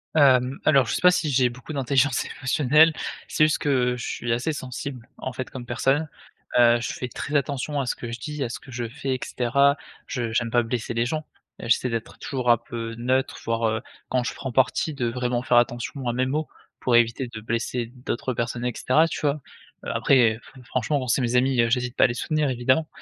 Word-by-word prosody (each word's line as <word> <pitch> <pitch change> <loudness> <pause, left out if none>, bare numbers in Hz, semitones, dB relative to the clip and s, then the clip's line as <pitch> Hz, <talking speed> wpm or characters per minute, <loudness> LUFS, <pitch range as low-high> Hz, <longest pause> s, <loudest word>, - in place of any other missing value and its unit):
Hem, 130 -3 +4
alors 135 -4 +5
je - - -1
sais - - -2
pas 180 - +7
si 160 -4 0
j'ai 130 -2 +3
beaucoup 125 +6 -9
d'intelligence 135 -1 +1
émotionnelle, 150 +4 +3 0.3
c'est 155 - +2
juste 155 - +2
que 125 -4 +1
je 120 - -5
suis 120 - -3
assez 125 +7 0
sensible, 130 -2 -6
en 130 - -5
fait, 130 +1 -5
comme 125 -3 -8
personne. 135 +6 +1 0.5
Heu, 120 0 +6
je - - -3
fais 125 - -5
très 145 +4 -5
attention 140 +1 0
à - - -3
ce - - -1
que 120 - -7
je 120 - -5
dis, 150 +2 -4
à 120 - -2
ce - - -6
que 130 - -14
je 120 -1 -3
fais, 135 +2 -3
et - - -5
cetera. 140 +4 +2 0.3
Je 120 -4 -3
j'aime 115 0 +1
pas 120 +1 +3
blesser 120 0 -3
les 115 +1 +1
gens. 155 +5 -3 0.3
Et - - -6
j'essaie 125 +2 +3
d'être 115 -1 -4
toujours 125 -3 -2
un 120 - +5
peu 115 -1 -6
neutre, 130 +3 0
voire, 115 0 0
heu, 110 0 -1 0.3
quand 125 -1 +1
je - - -3
prends 130 - -5
parti 135 +5 +1
de 125 -4 -1
vraiment 125 0 -1
faire 120 - +3
attention 120 +2 0
à 120 - +1
mes 130 +1 +1
mots. 150 +4 -1 0.3
Pour 120 -2 +2
éviter 120 +2 +3
de 110 -2 -8
blesser 115 +1 -2
d'autres 125 +1 -4
personnes 120 +1 -3
et 125 - +1
cetera, 155 +6 +3
tu - - -4
vois? 145 0 0 0.4
Heu, - - -4
après, 115 -5 +3
fre 130 +2 -16
franchement, 130 +3 -1
c'est 125 +3 +2
mes 120 0 0
amis, 130 0 +3
heu, 115 - +2
j'hésite 125 0 0
pas - - +6
à - - +5
les 120 - -3
soutenir, 155 +2 0
évidemment, 130 +6 +1
125 Hz, 230 wpm, -24 LUFS, 120-140 Hz, 0.5 s, pas